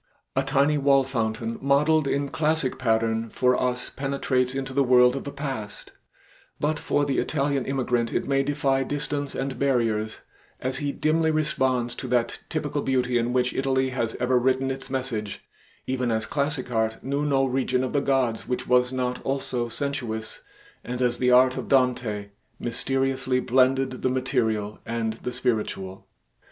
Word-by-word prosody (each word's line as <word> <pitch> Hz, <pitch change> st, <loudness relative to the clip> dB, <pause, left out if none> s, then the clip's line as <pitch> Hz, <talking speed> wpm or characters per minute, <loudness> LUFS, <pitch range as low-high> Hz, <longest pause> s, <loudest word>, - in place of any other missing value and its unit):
A 135 Hz, -, +3 dB
tiny 140 Hz, +2 st, +2 dB
wall 135 Hz, -1 st, +4 dB
fountain 115 Hz, -3 st, -2 dB
modeled 145 Hz, +2 st, +3 dB
in 140 Hz, 0 st, 0 dB
classic 155 Hz, -3 st, 0 dB
pattern, 115 Hz, -1 st, +1 dB
for 125 Hz, +3 st, +2 dB
us 125 Hz, -1 st, -1 dB
penetrates 135 Hz, -2 st, -1 dB
into 135 Hz, 0 st, -3 dB
the 140 Hz, -, +2 dB
world 125 Hz, 0 st, +5 dB
of 135 Hz, -, -5 dB
the 140 Hz, -, -4 dB
past, 135 Hz, -8 st, -6 dB, 0.7 s
but 150 Hz, +1 st, 0 dB
for 145 Hz, -, +1 dB
the 140 Hz, -2 st, 0 dB
Italian 140 Hz, -2 st, 0 dB
immigrant 125 Hz, -3 st, 0 dB
it -, -, -1 dB
may 135 Hz, 0 st, +2 dB
defy 135 Hz, -1 st, +1 dB
distance 145 Hz, +1 st, -2 dB
and 135 Hz, 0 st, -3 dB
barriers 115 Hz, -5 st, 0 dB, 0.4 s
as 130 Hz, +1 st, -1 dB
he 145 Hz, -2 st, -1 dB
dimly 160 Hz, +2 st, +1 dB
responds 130 Hz, -6 st, +1 dB
to 130 Hz, -, -6 dB
that 120 Hz, -1 st, 0 dB
typical 150 Hz, -2 st, -2 dB
beauty 125 Hz, -2 st, +1 dB
in 120 Hz, +1 st, -1 dB
which 125 Hz, 0 st, +1 dB
Italy 130 Hz, -1 st, +1 dB
has 120 Hz, -3 st, -2 dB
ever 125 Hz, 0 st, +3 dB
written 130 Hz, +1 st, +1 dB
its 135 Hz, 0 st, -6 dB
message, 125 Hz, -6 st, -3 dB, 0.4 s
even 130 Hz, -2 st, -1 dB
as 110 Hz, -1 st, 0 dB
classic 140 Hz, -3 st, -2 dB
art 110 Hz, -1 st, -1 dB
knew 140 Hz, +2 st, -1 dB
no 135 Hz, -2 st, +2 dB
region 130 Hz, 0 st, 0 dB
of 130 Hz, -, -3 dB
the 145 Hz, -, +2 dB
gods 130 Hz, -5 st, 0 dB
which 125 Hz, 0 st, -2 dB
was 125 Hz, 0 st, +3 dB
not 125 Hz, -1 st, -2 dB
also 130 Hz, -3 st, -2 dB
sensuous, 120 Hz, -5 st, -3 dB, 0.4 s
and 125 Hz, 0 st, -4 dB
as 120 Hz, -1 st, 0 dB
the 125 Hz, -, +3 dB
art 130 Hz, +1 st, +5 dB
of -, -, -4 dB
Dante 120 Hz, -6 st, +1 dB, 0.3 s
mysteriously 130 Hz, +1 st, 0 dB
blended 130 Hz, +1 st, +2 dB
the 130 Hz, -, +1 dB
material 110 Hz, -5 st, -1 dB
and 115 Hz, -1 st, -2 dB
the 125 Hz, -, -3 dB
spiritual. 105 Hz, -6 st, -2 dB
130 Hz, 165 wpm, -25 LUFS, 120-135 Hz, 0.7 s, world